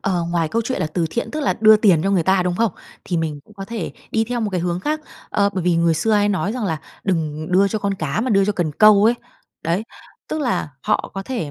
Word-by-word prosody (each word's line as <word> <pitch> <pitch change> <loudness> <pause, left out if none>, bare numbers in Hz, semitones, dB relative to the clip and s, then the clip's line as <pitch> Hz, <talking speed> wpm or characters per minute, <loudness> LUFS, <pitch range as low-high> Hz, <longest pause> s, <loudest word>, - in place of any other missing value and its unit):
Ờ, 180 -3 0
ngoài 165 -2 0
câu 230 +5 0
chuyện 260 +3 -3
là - - +1
từ 165 +1 -1
thiện, 235 - -3
tức 305 - -3
là 280 - +1
đưa 215 0 +8
tiền 190 -7 +4
cho 195 - +1
người 185 -4 +2
ta, 190 +1 +3
đúng 180 -1 -1
không? 230 -6 +1 0.3
Thì 175 - -2
mình 155 -3 -2
cũng 215 - -20
có 195 -1 -7
thể 230 +1 -5 0.2
đi 225 0 +1
theo 240 +1 -3
một 215 - -1
cái 185 -3 -1
hướng 175 0 -2
khác. 305 +7 -1 0.3
Ờ, 200 -1 +2
bởi 185 - -2
vì 175 -2 +3
người 165 -1 +3
xưa 215 +8 0
hay 205 0 +3
nói 200 +1 0
rằng 245 -4 -3
là 160 -4 -1 0.3
"Đừng 155 -4 -1
đưa 195 +2 +4
cho 215 - -2
con 200 -1 -1
cá 155 +2 -2
mà 250 +1 -1
đưa 195 -1 +4
cho 210 - +1
cần 170 -6 -1
câu" 210 +3 +6
ấy. 235 +2 +5 0.5
Đấy, 170 +5 0 0.5
tức 310 - -2
là 245 - -1
họ - - 0
có 195 - -4
thể, 210 - -4
195 Hz, 275 wpm, -20 LUFS, 170-220 Hz, 0.5 s, đưa